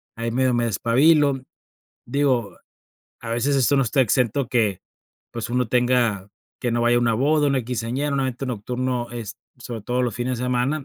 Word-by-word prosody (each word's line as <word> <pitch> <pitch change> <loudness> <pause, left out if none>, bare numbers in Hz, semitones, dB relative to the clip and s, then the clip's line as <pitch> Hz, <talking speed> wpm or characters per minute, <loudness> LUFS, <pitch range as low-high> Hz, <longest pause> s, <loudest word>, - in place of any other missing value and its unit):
ahí 115 0 -3
medio 130 +1 +1
me 120 - +1
despabilo. 135 - +3 0.6
Digo, 125 -6 0 0.6
a 115 - -7
veces 130 +5 +1
esto 135 +2 +3
no 135 - +4
está 135 +3 +1
exento 125 +2 +1
que, 110 -7 +1 0.5
pues, 115 0 -5
uno 125 -2 0
tenga 120 -5 +1 0.3
que 120 - -1
no 120 0 0
vaya 120 0 +3
a - - +3
una 120 -1 +2
boda, 145 +4 +2
una 135 -3 +1
quinceañera, 125 +4 -2
un 135 - +1
evento 130 0 -3
nocturno 125 +1 -3
es 115 -4 -7 0.2
sobre 120 -2 -7
todo 125 +3 -1
los 120 -2 -1
fines 125 +1 -2
de 125 - -3
semana, 130 +4 0
125 Hz, 185 wpm, -23 LUFS, 115-135 Hz, 0.6 s, no